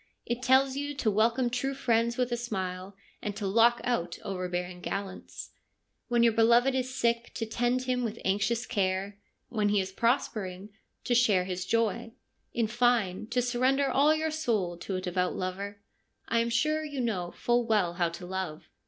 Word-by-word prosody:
It 240 +1 -2
tells 265 +2 +4
you 285 +1 -3
to 235 -5 +1
welcome 230 +4 +2
true 270 +3 -1
friends 235 -2 +1
with 250 -1 0
a - - +2
smile, 190 -5 -4 0.3
and 205 -1 -4
to 205 - -4
lock 230 +4 +4
out 175 -9 -1
overbearing 180 -1 -4
gallants; 195 -1 -6 0.6
when 240 -1 +3
your 230 -1 +5
beloved 235 +4 +4
is 260 0 -1
sick, 235 0 0
to 225 - -2
tend 240 +3 0
him 250 -1 0
with 230 -1 -3
anxious 205 +5 +1
care; 200 -1 -1 0.3
when 210 -3 +1
he 205 0 +3
is 190 0 -2
prospering, 205 -4 -1 0.3
to 245 - 0
share 220 -7 +4
his 185 0 -4
joy; 230 +1 0 0.4
in 235 - 0
fine, 225 -4 +1
to 245 +2 0
surrender 260 +3 +2
all 295 +3 +4
your 315 0 -1
soul 220 - -1
to 190 - -4
a 185 - -2
devout 180 0 -1
lover. 200 +2 -4 0.5
I 230 - +2
am 230 0 +1
sure 305 +6 +1
you 290 -3 -5
know 200 -8 -1
full 240 +3 0
well 205 -6 +2
how 175 -1 +1
to 170 +2 -8
love. 185 -4 -5
230 Hz, 180 wpm, -29 LUFS, 190-245 Hz, 0.6 s, your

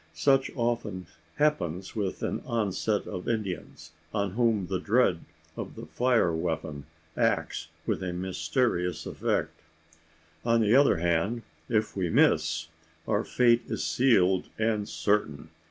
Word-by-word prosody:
Such 135 +12 +3
often 115 -7 -2 0.3
happens 95 - 0
with 100 -4 -2
an - - -2
onset 105 -2 -1
of 90 - -6
Indians 100 -7 -4 0.2
on 100 -2 0
whom 110 -2 +1
the 95 +1 -2
dread 100 -3 +2 0.4
of - - -6
the - - -8
fire 100 +2 +2
weapon 80 -3 -3 0.3
acts - - 0 0.2
with - - -1
a 90 -1 -2
mysterious 90 - -1
effect. - - -2 0.8
On 115 0 +3
the 110 0 +3
other 140 - +5
hand, 85 +8 0 0.3
if 110 -2 0
we 90 -3 -1
miss, 80 +1 +2 0.4
our 105 +1 +1
fate 120 -1 +3
is - - -2
sealed 95 -8 +3
and 110 -2 0
certain. 90 -8 0
100 Hz, 130 wpm, -28 LUFS, 90-115 Hz, 0.8 s, other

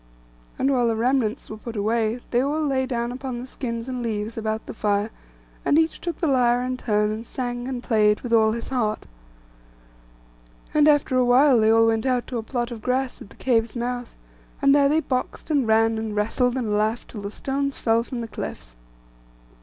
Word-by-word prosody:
And 270 - +2
when 245 -2 +2
the 225 - +1
remnants 240 0 0
were 215 - -7
put 230 +1 -8
away, 220 +3 0
they 245 - +3
all 300 +3 0
lay 260 -2 0
down 240 -2 -2
upon 255 -1 -5
the 245 - -6
skins 235 -3 -5
and 255 -1 -4
leaves 220 -1 -3
about 220 -1 -3
the - - -7
fire, 210 0 0 0.5
and 290 - +3
each 320 0 +1
took 345 -3 -3
the - - -1
lyre 245 -4 +3
in 255 0 -2
turn, 210 -4 0
and 220 +1 -4
sang 245 0 -4
and 250 -2 -4
played 210 -3 +3
with 240 -2 -3
all 220 -1 +5
his 235 - -5
heart. 230 -5 -1 1.7
And 300 0 +5
after 290 -3 +3
a 255 - +4
while 250 +1 +5
they 220 0 +4
all 225 0 +5
went 225 +2 +1
out 250 -2 +1
to 245 - -2
a - - -2
plot 240 +1 -3
of 230 -2 -7
grass 255 +2 -1
at - - -11
the - - -16
cave's 230 -3 0
mouth, 245 0 -4 0.4
and 275 -1 +4
there 280 -1 +5
they 310 +2 +3
boxed, 260 +3 -3
and 280 -6 +2
ran, 225 0 +3
and 220 -1 -4
wrestled, 245 +4 +1
and 225 -5 -1
laughed 215 +3 -1
till 210 - -7
the 200 - -4
stones 275 +5 -3
fell 225 0 +2
from 245 0 -5
the 230 - -5
cliffs. 75 - -7
240 Hz, 210 wpm, -24 LUFS, 220-260 Hz, 1.7 s, all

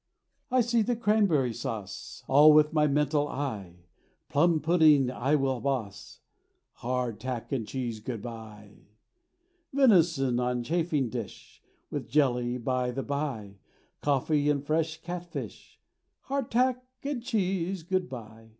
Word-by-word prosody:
I 255 0 +3
see 235 0 +2
the 240 +3 0
cranberry 200 - +2
sauce, 105 -4 -6
All 150 +3 +7
with 150 +1 +4
my 150 -1 +3
mental 145 0 +1
eye; 100 -12 -5 0.4
Plum 160 +2 +3
pudding 155 -5 +4
I 135 +4 +1
will 135 -3 0
boss; 115 -8 -4 0.6
Hard 125 -2 -2
tack 130 -3 -5
and 120 -6 -2
cheese, 120 -4 -4
good 115 +1 -5
bye! 110 -3 -10 0.8
Venison 170 - +3
on 125 -1 -1
chafing 160 -2 0
dish, 115 -4 -8 0.3
With - - -4
jelly, 125 -3 +1
by 125 0 -1
the 130 +2 -3
bye, 130 -9 -4 0.4
Coffee 145 +1 +1
and 145 -1 0
fresh 160 +1 0
cat 175 0 -5
fish; - - -8 0.4
Hard 275 -2 -3
tack 250 +1 +1 0.2
and 280 -3 -3
cheese, 195 -6 -1
good 185 +1 -1
bye! 110 -2 -10
140 Hz, 130 wpm, -28 LUFS, 120-170 Hz, 0.8 s, All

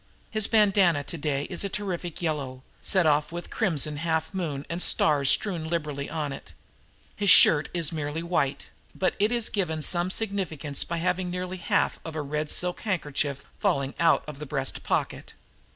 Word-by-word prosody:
His 215 -2 +1
bandanna 195 -8 +4
today 145 -3 -2
is 175 +4 -2
a 200 - -2
terrific 180 -4 -4
yellow, 135 -5 -3 0.2
set 185 -3 +3
off 150 0 +2
with 175 +1 -7
crimson 155 - 0
half 160 +2 -1
moon 150 -7 -3
and 170 +1 -4
stars 145 -6 +2
strewn 170 -4 +1
liberally 150 -4 -3
on 150 -3 -3
it. - - -11 0.6
His 205 -1 +1
shirt 150 -4 +7
is 170 -4 +1
merely 155 0 -3
white, 165 -6 -1 0.3
but 185 -1 +1
it 210 +3 +2
is 235 -2 +1
given 160 -6 -2
some 175 +2 +3
significance 185 -9 -1
by 170 - -4
having 180 +1 -1
nearly 180 +1 -4
half 175 - 0
of 160 -1 -7
a 155 - -2
red 150 +1 -3
silk 180 0 0
handkerchief 145 -7 -2
falling 140 0 0
out 165 -1 +4
of 150 -2 -8
the 150 - -7
breast 135 -2 -2
pocket. - - -2
165 Hz, 170 wpm, -26 LUFS, 145-185 Hz, 0.6 s, shirt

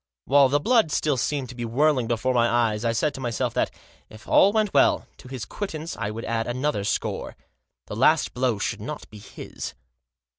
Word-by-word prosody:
While 140 -1 +5
the 145 +2 +2
blood 225 -1 +3
still 150 -2 +1
seemed 130 0 -2
to 125 - -9
be 120 - -5
whirling 130 +1 +2
before 120 +2 0
my 120 -1 +3
eyes 115 -2 +1
I 115 - +1
said 145 +6 0
to 135 - -8
myself 120 -3 -2
that, - - +1 0.4
if 110 0 -14
all 195 - +5
went 215 -2 0
well, 140 - +4
to - - -14
his 130 -3 -6
quittance 165 -5 -5
I 100 - -3
would 110 +2 -6
add 115 0 -1
another 125 -2 -1
score. 100 - -2 0.5
The - - -7
last 130 - +3
blow 125 -3 0
should - - -3
not - - -6
be 105 - -11
his. 100 - -8
125 Hz, 200 wpm, -24 LUFS, 115-150 Hz, 0.5 s, While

